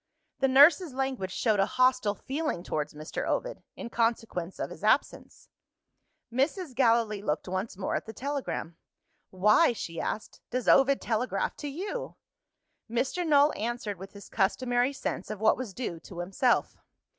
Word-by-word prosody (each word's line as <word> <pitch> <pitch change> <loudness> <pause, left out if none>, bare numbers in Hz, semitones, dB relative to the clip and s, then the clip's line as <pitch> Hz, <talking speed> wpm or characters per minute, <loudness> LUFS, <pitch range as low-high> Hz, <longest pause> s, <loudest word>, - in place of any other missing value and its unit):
The 270 - +3
nurse's 290 +3 +6
language 260 -8 -2
showed 215 +2 +1
a 195 - +3
hostile 255 -5 +2
feeling 275 - -3
towards 150 -3 -3
Mr. 155 +2 -5
Ovid, - - -2
in 235 - -7
consequence 225 -6 -1
of - - -4
his - - -11
absence. - - 0 0.9
Mrs. 285 +4 0
Gallilee 230 -4 +2
looked 160 -5 -2
once 185 +2 -3
more 190 - -2
at - - -3
the - - -5
telegram. 270 - -4 0.5
"Why," 210 - +4
she 165 -6 -5
asked, 215 - -4
"does 250 0 -3
Ovid 275 0 +5
telegraph 235 +2 -1
to 295 - -5
You?" 390 - -5 0.7
Mr. 260 +9 -1
Null 290 0 +5
answered 220 -3 -3
with 195 +1 -10
his 200 -1 -11
customary 245 +5 +1
sense 275 - -4
of 215 - -5
what 220 0 +4
was 255 -5 -5
due 185 -5 -5
to 170 +2 -12
himself. 195 +7 +1
235 Hz, 155 wpm, -29 LUFS, 195-270 Hz, 0.9 s, nurse's